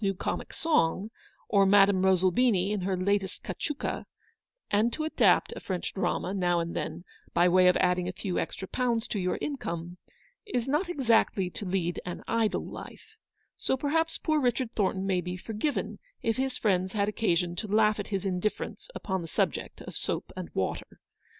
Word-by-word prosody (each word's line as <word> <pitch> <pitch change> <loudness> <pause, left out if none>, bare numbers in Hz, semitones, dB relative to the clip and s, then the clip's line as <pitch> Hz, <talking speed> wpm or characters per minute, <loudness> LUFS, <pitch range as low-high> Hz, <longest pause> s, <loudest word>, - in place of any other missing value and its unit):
119 195 -1 +1
new - - -22
comic - - -3
song, 210 - +1 0.4
or 200 -2 +4
Madame 195 -1 +5
Rosalbini 190 +2 +3
in 210 -2 -1
her 185 0 0
latest 195 +1 0
cachuca; 295 -2 -3 0.6
and 215 +3 +3
to 310 - -3
adapt 315 - +3
a - - -6
French 185 -2 -3
drama, 190 -1 -1
now 175 -3 +2
and 170 0 -3
then, 160 +2 -4 0.3
by 175 +1 +5
way 180 +1 +5
of 180 - +5
adding 180 0 +2
a - - -1
few 185 0 -3
extra 190 - -4
pounds 235 -1 0
to 205 - -2
your 180 -1 0
income, 175 - -4 0.4
is 250 - -2
not 305 +7 +1
exactly 230 - +2
to 200 - -6
lead 180 -2 -1
an 180 - -6
idle 230 -2 +1
life: 435 - -10 0.4
so 265 - 0
perhaps 325 +4 +1
poor 310 -2 +1
Richard 245 -1 +1
Thornton 190 -3 0
may 185 -2 +1
be 180 0 -4
forgiven 225 +9 -3 0.2
if 225 +1 +1
his 265 -1 -1
friends 185 -3 +1
had 200 -2 +1
occasion 180 -5 +1
to 215 - -3
lausrh 215 +1 +3
at 205 - -3
his 195 -2 -2
indifference 190 +2 -2
upon 190 -2 -2
the 165 - -6
subject - - -1
of - - -9
soap - - -3
and - - -6
water. - - -3
195 Hz, 180 wpm, -29 LUFS, 180-230 Hz, 0.6 s, Madame